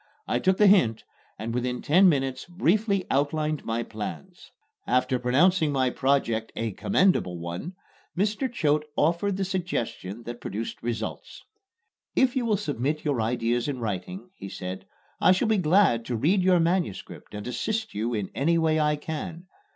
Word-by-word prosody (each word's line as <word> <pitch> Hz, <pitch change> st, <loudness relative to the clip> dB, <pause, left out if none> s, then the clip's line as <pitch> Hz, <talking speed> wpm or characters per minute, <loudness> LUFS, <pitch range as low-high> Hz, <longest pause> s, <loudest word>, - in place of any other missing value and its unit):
I -, -, +1 dB
took 190 Hz, 0 st, +2 dB
the 210 Hz, -, +5 dB
hint 130 Hz, -, +4 dB, 0.3 s
and 115 Hz, +2 st, -4 dB
within 125 Hz, 0 st, -2 dB
ten 185 Hz, +5 st, +6 dB
minutes 135 Hz, -4 st, -1 dB
briefly 195 Hz, +2 st, +1 dB
outlined 150 Hz, +2 st, 0 dB
my 115 Hz, +1 st, -2 dB
plans. 145 Hz, -, -8 dB, 0.4 s
After 125 Hz, +1 st, +2 dB
pronouncing 155 Hz, +6 st, +3 dB
my 130 Hz, -2 st, +1 dB
project 115 Hz, -5 st, 0 dB
a 115 Hz, -1 st, -2 dB
"commendable 185 Hz, -, +1 dB
one," 85 Hz, -, -6 dB, 0.4 s
Mr. 215 Hz, +6 st, 0 dB
Choate 150 Hz, -8 st, +1 dB
offered 175 Hz, +5 st, +1 dB
the 195 Hz, -, -1 dB
suggestion 120 Hz, -, -3 dB
that 120 Hz, +1 st, -7 dB
produced 110 Hz, +4 st, -5 dB
results. 115 Hz, -2 st, -5 dB, 0.7 s
"If 260 Hz, -1 st, +3 dB
you 245 Hz, -3 st, 0 dB
will 215 Hz, -2 st, +2 dB
submit 150 Hz, -, -2 dB
your 140 Hz, -6 st, +1 dB
ideas 120 Hz, +2 st, 0 dB
in 140 Hz, -3 st, -2 dB
writing," 125 Hz, -, -5 dB
he 100 Hz, -, -9 dB
said, 90 Hz, 0 st, -6 dB, 0.3 s
"I -, -, +5 dB
shall 190 Hz, +5 st, +1 dB
be 220 Hz, -1 st, +3 dB
glad 160 Hz, -, +3 dB
to 125 Hz, -, -2 dB
read 180 Hz, -, +2 dB
your 180 Hz, -1 st, +4 dB
manuscript 170 Hz, -, -2 dB
and 105 Hz, -, -6 dB
assist 215 Hz, -, -2 dB
you 115 Hz, +3 st, -1 dB
in 105 Hz, -3 st, -3 dB
any 165 Hz, +5 st, +2 dB
way 160 Hz, -1 st, +2 dB
I 150 Hz, 0 st, +2 dB
can. 165 Hz, +3 st, -6 dB
150 Hz, 160 wpm, -26 LUFS, 120-185 Hz, 0.7 s, ten